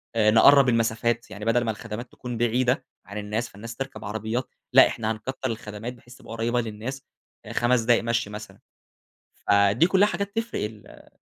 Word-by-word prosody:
آآ، 110 -1 +4
نقرَّب 135 +4 +7
المسافات 115 0 0
يعني 105 +1 -7
بدل 115 +1 +2
ما 110 - +1
الخدمات 115 +2 -7
تكون 120 -2 -6
بعيدة 125 +3 +1 0.2
عن 100 - -8
الناس 105 +3 -3
فالناس 115 +3 -9
تركب 135 -3 -6
عربيات، 110 +4 -3 0.2
لأ - - +9
إحنا 110 0 -2
هنكتّر 110 +4 -4 0.2
الخدمات 110 +1 -6
بحيث 120 0 -16
تبقى - - -13
قريّبة 120 +2 0
للناس 115 +5 -6 0.5
5 120 0 +2
دقايق 120 +1 +3
مشي 115 -2 0
مثلًا. 105 -2 -9 0.8
فدي 100 - +3
كلّها 190 +2 +4
حاجات 200 0 -3
تفرق 225 - -2
ال 105 -1 -10
115 Hz, 165 wpm, -25 LUFS, 110-125 Hz, 0.8 s, لأ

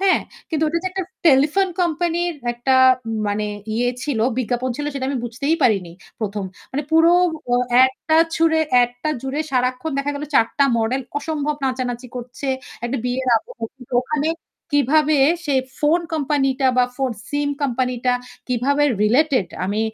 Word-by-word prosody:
হ্যাঁ? 385 -1 +3 0.3
কিন্তু 315 -2 -1
ওটা 330 +2 0
তো - - -3
একটা 380 +1 -3 0.2
টেলিফোন 305 +7 +4
কোম্পানির 345 0 0 0.2
একটা 250 +2 +1 0.5
মানে 210 +1 -1 0.3
ইয়ে 245 +2 +1
ছিল, 285 -6 -2 0.2
বিজ্ঞাপন 250 +1 -1
ছিল 295 - -3
সেটা 265 -1 -2
আমি 275 -2 -1
বুঝতেই 265 +7 -1
পারিনি 195 -8 +2 0.3
১ম। 205 -1 -3 0.3
মানে 285 +3 -1
পুরো 325 +1 +6 0.4
ও - - +5 0.3
এড 260 0 +4 0.2
টা 315 - +5 0.2
ছুড়ে 320 -1 +3 0.2
এড 245 0 +2
টা 310 - 0
জুড়ে 270 +3 -2
সারাক্ষণ 255 +3 0
দেখা 280 +1 -1
গেল 285 +1 -4
৪ 230 - +5
টা 280 - +6
মডেল 230 +4 0 0.2
অসম্ভব 300 0 -2
নাচানাচি 250 -1 -2
করছে। 250 +3 -7 0.4
একটা 250 +3 -2
বিয়ের 255 +1 -1
আবহ 225 - -6 0.2
কিন্তু 250 -2 -15
ওখানে 300 +3 -1 0.5
কিভাবে 300 +2 +3 0.3
সে 290 -3 0 0.3
ফোন 310 +4 +3
কোম্পানি 290 -3 +1
টা 265 - +4
বা 250 - +6
ফোন 270 -2 0 0.2
সিম 290 0 -1
কোম্পানি 255 -1 0
টা 250 - +4 0.4
কিভাবে 270 +4 +1 0.2
রিলেটেড 255 - +3 0.2
আমি 205 +3 -1
270 Hz, 165 wpm, -21 LUFS, 245-305 Hz, 0.5 s, পুরো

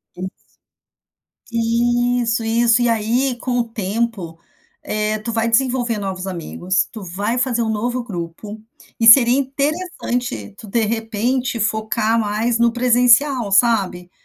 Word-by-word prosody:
Isso 185 +1 -5 1.2
Isso 235 0 +1
isso 230 +1 +2
e 240 - +2
aí 240 +3 0
com 245 0 -2
o - - +2
tempo, 210 -5 -4 0.4
eh, 215 0 -2
tu 230 +2 -5
vai 225 0 0
desenvolver 245 -1 +1
novos 190 -2 -5
amigos. 180 +1 -2
Tu 220 - -9
vai 200 +7 -3
fazer 245 -2 0
um 225 - -1
novo 240 +3 -2
grupo 205 +1 -7 0.4
e 225 - +3
seria 240 +2 +8
interessante, 275 - -3
tu 220 - -11
de 225 +3 0
repente 230 +3 -2
focar 220 +1 0
mais 225 +3 -1
no 235 0 +3
presencial, 245 -1 +3
sabe? 195 -5 +2
230 Hz, 130 wpm, -19 LUFS, 210-245 Hz, 1.2 s, seria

